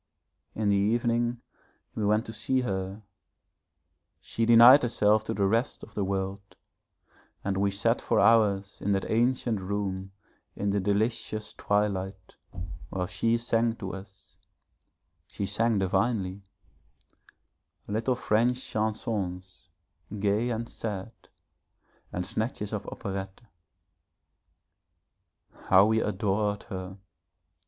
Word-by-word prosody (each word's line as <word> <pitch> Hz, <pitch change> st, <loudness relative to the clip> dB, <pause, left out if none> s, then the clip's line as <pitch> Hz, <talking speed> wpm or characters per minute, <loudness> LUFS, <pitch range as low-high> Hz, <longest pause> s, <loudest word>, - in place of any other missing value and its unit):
In 105 Hz, -1 st, 0 dB
the 100 Hz, -, +4 dB
evening 120 Hz, +3 st, +1 dB, 0.5 s
we 110 Hz, -, -3 dB
went 105 Hz, +3 st, +2 dB
to 110 Hz, -, -7 dB
see 130 Hz, +4 st, 0 dB
her; 95 Hz, -2 st, -3 dB, 1.2 s
she 115 Hz, 0 st, -2 dB
denied 120 Hz, +4 st, +9 dB
herself 110 Hz, -3 st, +2 dB
to -, -, -2 dB
the 100 Hz, 0 st, +1 dB
rest 115 Hz, +7 st, 0 dB
of -, -, -12 dB
the 105 Hz, -, -1 dB
world, 95 Hz, +1 st, -3 dB, 0.9 s
and 100 Hz, 0 st, -1 dB
we 100 Hz, +1 st, +2 dB
sat 115 Hz, +4 st, +1 dB
for -, -, +1 dB
hours 100 Hz, -3 st, +3 dB
in 100 Hz, -, 0 dB
that 95 Hz, -, -1 dB
ancient 120 Hz, -2 st, +1 dB
room 95 Hz, -1 st, -3 dB, 0.4 s
in 100 Hz, 0 st, -1 dB
the 100 Hz, -, +1 dB
delicious 105 Hz, +2 st, -1 dB
twilight, 95 Hz, -2 st, -2 dB, 0.5 s
while 90 Hz, 0 st, -2 dB
she 115 Hz, +6 st, +1 dB
sang 115 Hz, 0 st, +1 dB
to 95 Hz, -4 st, -6 dB
us 95 Hz, 0 st, -12 dB, 0.9 s
she 100 Hz, -, -4 dB
sang 115 Hz, +2 st, +1 dB
divinely 95 Hz, 0 st, 0 dB, 1.5 s
little 115 Hz, +5 st, 0 dB
French 120 Hz, +1 st, +2 dB
chansons, 105 Hz, -6 st, -3 dB, 0.5 s
gay 105 Hz, +4 st, +1 dB
and 115 Hz, 0 st, -3 dB
sad, 105 Hz, -1 st, -5 dB, 1.0 s
and 90 Hz, 0 st, -3 dB
snatches 110 Hz, +1 st, -3 dB
of 105 Hz, -1 st, -3 dB
operette. 95 Hz, +2 st, -6 dB, 2.3 s
How 95 Hz, +1 st, +7 dB
we 110 Hz, +1 st, +2 dB
adored 105 Hz, 0 st, -1 dB
her! 95 Hz, -2 st, -7 dB
105 Hz, 115 wpm, -28 LUFS, 95-115 Hz, 2.3 s, denied